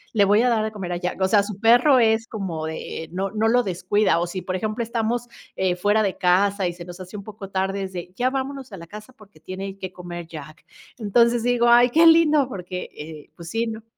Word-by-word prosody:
le 205 - +5
voy 210 +4 +4
a 250 - +3
dar 225 -2 +1
de 220 - -2
comer 195 -4 -6
a - - -2
Jack". 180 +1 -4
O 190 - +3
sea, 200 +1 +4
su 200 -1 -7
perro 245 +5 +5
es 225 -1 +3
como 180 -9 -4
de 160 0 -6
eh 160 - -19
no 195 +2 -3
no 220 0 0
lo 245 +1 +3
descuida, 185 0 +1
o 175 - -1
si 185 +2 -5
por 185 - -4
ejemplo, 215 +4 -3
estamos 235 +1 -2 0.3
eh, 185 -2 0
fuera 205 +4 +2
de 195 - -2
casa 195 +2 +2
y 175 - -3
se 175 0 -10
nos 175 +1 -10
hace 185 +3 -8
un 200 - -8
poco 200 -2 -9
tarde, 195 +1 -2
es 190 0 -7
de: 175 0 -7
"Ya 250 +1 +1
vámonos 270 -1 -5
a - - -7
la 170 -1 -11
casa 215 +6 -11
porque 205 -8 -19
tiene 190 +4 -7
que 185 -1 -6
comer 175 -1 -8
Jack". 155 -1 -11 0.3
Entonces 235 +2 +2
digo: 245 -1 +2
"Ay, 240 +1 +6
qué 325 +7 +4
lindo". 310 -4 +5
Porque 180 -3 -6
eh 150 0 -10
pues 170 -2 -10
sí, 225 +4 -1
¿no? 220 0 -6
200 Hz, 250 wpm, -23 LUFS, 180-230 Hz, 0.3 s, Ay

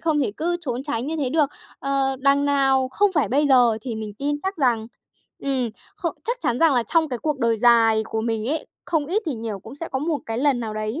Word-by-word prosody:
không 310 -3 +1
thể 245 - 0
cứ 345 +2 0
trốn 255 -6 -3
tránh 275 -3 -3
như 320 - -2
thế 280 -5 -1
được. 300 -1 +3 0.3
Ờ, 275 -1 0
đằng 280 +1 +3
nào 270 -2 +2
không 400 +8 +2
phải 290 - +1
bây 290 +4 +2
giờ 240 -4 +5
thì 245 -3 -4
mình 215 -2 -6
tin 290 +1 -1
chắc 385 0 -2
rằng 240 -6 +1 0.5
ừm, 260 -4 -1 0.3
khô - - -1
chắc 480 +1 -2
chắn 240 - 0
rằng 325 -4 +4
là 245 - +3
trong 320 +5 +1
cái 250 -3 -3
cuộc 300 +2 -2
đời 230 -2 +2
dài 225 -2 +5
của 220 0 -3
mình 225 -1 -2
ấy, 310 +1 -2 0.2
không 310 -4 0
ít 405 +7 0
thì 290 - -1
nhiều 220 -3 -5
cũng 220 +6 -11
sẽ 330 +4 -6
có 265 - -2
một 305 +1 -1
cái 225 0 -3
lần 270 -2 +2
nào 220 -2 -4
đấy 215 +7 -3
270 Hz, 250 wpm, -23 LUFS, 230-300 Hz, 0.5 s, giờ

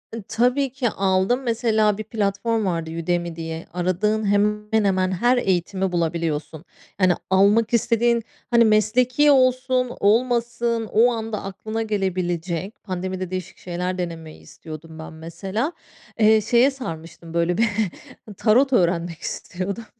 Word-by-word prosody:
I 230 - -5
tabii 250 +4 +1
ki 255 -2 -1
aldım. 195 +5 +1
Mesela, 220 -3 +1
bir 215 - -4
platform 215 +1 -1
vardı, 165 -3 -2
Udemy 175 -1 -1
diye. 165 0 -6
Aradığın 185 +5 0
hemen 210 +1 +1
hemen 185 -1 +1
her 240 +7 +2
eğitimi 190 -2 0
bulabiliyorsun. 165 -2 -2 0.4
Yani, 185 -1 +5 0.2
almak 205 +5 +3
istediğin, 235 0 +2 0.3
hani, 235 -1 +6
mesleki 245 +7 +3
olsun 255 -1 +2
olmasın, 235 +1 +1
o 235 +3 +4
anda 225 -2 -4
aklına 215 +3 -5
gelebilecek. 185 -3 -2
Pandemide 185 -1 -4
değişik 185 -2 -5
şeyler 180 +1 -4
denemeyi 165 -3 -6
istiyordum, 160 0 -11
ben 160 - -8
mesela. 190 - -4 0.5
Eee, 220 0 +5
şeye 240 +5 +4
sarmıştım, 165 -9 -8
böyle 170 +1 +1
bir 230 - +3 0.7
tarot 255 +5 +3
öğrenmek 170 -4 +1
istiyordum. 200 +5 -5
205 Hz, 125 wpm, -22 LUFS, 175-230 Hz, 0.7 s, hani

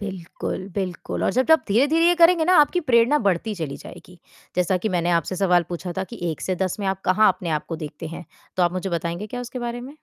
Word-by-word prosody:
बिल्कुल, 190 -1 -5
बिल्कुल। 185 -3 -3
और - - +2
जब 255 +1 +1
जब 320 0 +6
धीरे-धीरे 290 +10 +3
ये 350 - +5
करेंगे 335 -1 +5
ना 365 +2 +4
आपकी 355 +4 +2
प्रेरणा 235 +5 +5
बढ़ती 200 +4 0
चली 160 -6 -5
जाएगी, 180 -1 -13 0.4
जैसा 180 +1 +2
कि 215 +4 -2
मैंने 175 -2 0
आपसे 170 +2 0
सवाल 180 -2 +3
पूछा 175 0 -5
था 190 - -1
कि 235 +3 -11
1 155 - -6
से 185 - -1
10 185 +2 -3
में 195 - -2
आप 190 0 -1
कहाँ 215 +4 +4
अपने 180 -2 -6
आप 155 -1 -2
को 165 - -3
देखते 155 +1 -7
हैं, 170 +2 -8 0.3
तो 185 - +2
आप 175 0 +2
मुझे 185 +1 -3
बताएँगे 170 +4 -3
क्या 245 +3 -6
उसके 245 +1 -6
बारे 240 0 -4
में? 270 +5 -10
190 Hz, 245 wpm, -23 LUFS, 175-240 Hz, 0.4 s, जब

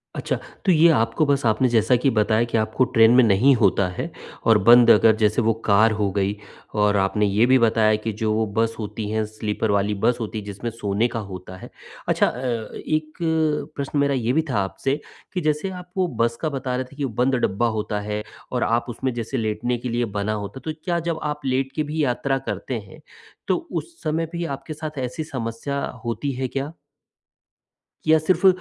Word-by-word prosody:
अच्छा। - - -2 0.3
तो 190 - +5
ये 165 0 +6
आपको 115 +2 +2
बस 140 -2 +1
आपने 115 +4 +3
जैसा 115 +1 +3
कि 125 +3 +2
बताया 110 +1 +3
कि 115 - -1
आपको 110 +3 +1
ट्रेन 115 0 +7
में 130 - +7
नहीं 115 +6 +5
होता 100 -4 +3
है 90 - -5 0.4
और 110 -1 +6
बंद 120 +2 +7
अगर 110 0 +6
जैसे 110 +1 +2
वो 115 0 +2
कार 110 +2 +5
हो 100 -1 +1
गई 100 +1 0 0.5
और 105 0 +3
आपने 100 +2 +1
ये 105 +3 +3
भी 130 +1 +5
बताया 110 -2 +3
कि 110 - 0
जो 110 0 +1
बस 115 0 +1
होती 105 0 -4
हैं, 110 0 0
स्लीपर 110 0 -2
वाली 100 +1 +1
बस 120 - +3
होती 110 -1 -4
है 105 - -9
जिसमें 100 +3 -5
सोने 105 0 0
का 115 - -4
होता 95 0 -8
है। - - -11 0.4
अच्छा - - +3
अ, 120 -3 -3
एक 155 0 -1 0.6
प्रश्न 140 +1 -2
मेरा 140 0 +2
ये 120 -1 0
भी 160 - +3
था 125 - 0
आपसे 135 +9 -2 0.3
कि 180 - -1
जैसे 155 +4 0
आप 180 -1 -9
वो 185 -1 +2
बस 115 0 +2
का 155 - 0
बता 135 -3 -3
रहे 130 +1 -2
थे - - -14
कि 145 - -4
वो 135 - -2
बंद 130 +1 +2
डब्बा 110 +5 0
होता 105 0 -2
है 105 +1 -4 0.3
और - - 0
आप 115 +1 +1
उसमें 130 +2 -3
जैसे 120 +3 -3
लेटने 115 +2 -1
के 125 +1 -5
लिए 120 +1 0
बना 105 +2 -1
होता 100 +6 -7
तो 155 - -2
क्या 175 -2 0
जब 165 -2 -1
आप 150 0 -3
लेट 135 +1 0
के 155 - 0
भी 150 +1 -2
यात्रा 135 +1 0
करते - - -3
हैं - - -14 0.5
तो - - +3 0.2
उस 345 - -4
समय 160 +2 0
भी 170 0 -3
आपके 135 +3 -9
साथ 155 0 -7
ऐसी 125 +5 -3
समस्या 135 0 -4 0.2
होती 120 +5 -2
है 130 0 -3
क्या? 135 +3 -4 1.4
या 160 0 +6
सिर्फ़ 185 +5 +3
120 Hz, 210 wpm, -23 LUFS, 110-140 Hz, 1.4 s, ट्रेन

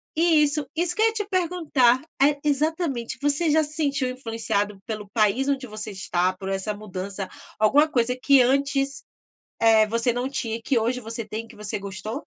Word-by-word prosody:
Isso 300 -3 +3
isso 350 +2 0
que 435 - -1
eu - - +6
ia 450 - 0
te 420 -2 -3
perguntar, 320 - +2 0.2
é 285 +1 +4
exatamente, 295 -4 -1
você 290 +3 +1
já 315 +1 +4
se 300 0 -7
sentiu 280 -4 0
influenciado 225 -5 -2
pelo 210 -2 -5
país 220 +5 +2
onde 270 -2 -1
você 215 0 -6
está, 185 -1 0
por 190 +1 -7
essa 195 +2 -2
mudança, 195 -1 -6 0.3
alguma 285 +8 +5
coisa 250 -2 +1
que 275 0 +5
antes, 275 +2 +1 0.6
eh, 220 -1 +5
você 230 +2 0
não 245 +2 -2
tinha 235 -5 -3
e 230 - -10
que 255 -1 +1
hoje 240 +3 -1
você 230 0 -5
tem 220 +1 -5
e - - -20
que - - -15
você 210 0 -4
gostou? 215 +7 -6
250 Hz, 190 wpm, -24 LUFS, 215-290 Hz, 0.6 s, eu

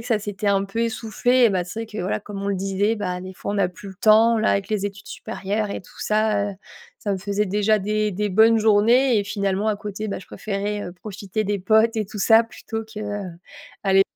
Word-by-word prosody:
que - - -11
ça 230 -3 +2
s'était 205 0 -3
un 195 0 +2
peu 200 +4 -4
essoufflé 240 +2 +1
et 230 - +5
ben, 185 -2 0
c'est 180 +6 -6
vrai - - -14
que, 215 0 -8
voilà, 185 +3 -1
comme 200 -1 -7
on 200 - -2
le 200 - 0
disait, 195 +3 0
bah, 180 -4 -3
des 185 0 -8
fois 195 - -5
on - - -2
n'a 200 -3 +2
plus 185 +3 -11
le 190 - -10
temps 220 +3 +5
là 215 - +2
avec 200 0 0
les 210 -2 -1
études 200 0 -6
supérieures 210 -1 -3
et - - -4
tout - - -18
ça, 210 -1 +1
heu, - - -8 0.4
ça 205 - -2
me - - 0
faisait 205 +2 -1
déjà 210 +2 +2
des 210 +1 0
des 210 +3 -1
bonnes 220 +4 +5
journées 225 +4 +4
et 205 - -1
finalement 200 0 -1
à 215 - +1
côté, 210 +1 -5
beh, 195 - -4
je - - -14
préférais, 205 0 -3
heu, 175 - -6
profiter 200 +2 -5
des 205 0 -1
potes 220 +4 +3
et 215 - 0
tout 210 +2 -9
ça 225 +3 +5
plutôt 225 0 -6
que, 220 -1 -9
heu, 205 -3 -4 0.5
aller 195 -1 +5
205 Hz, 250 wpm, -23 LUFS, 195-220 Hz, 0.5 s, et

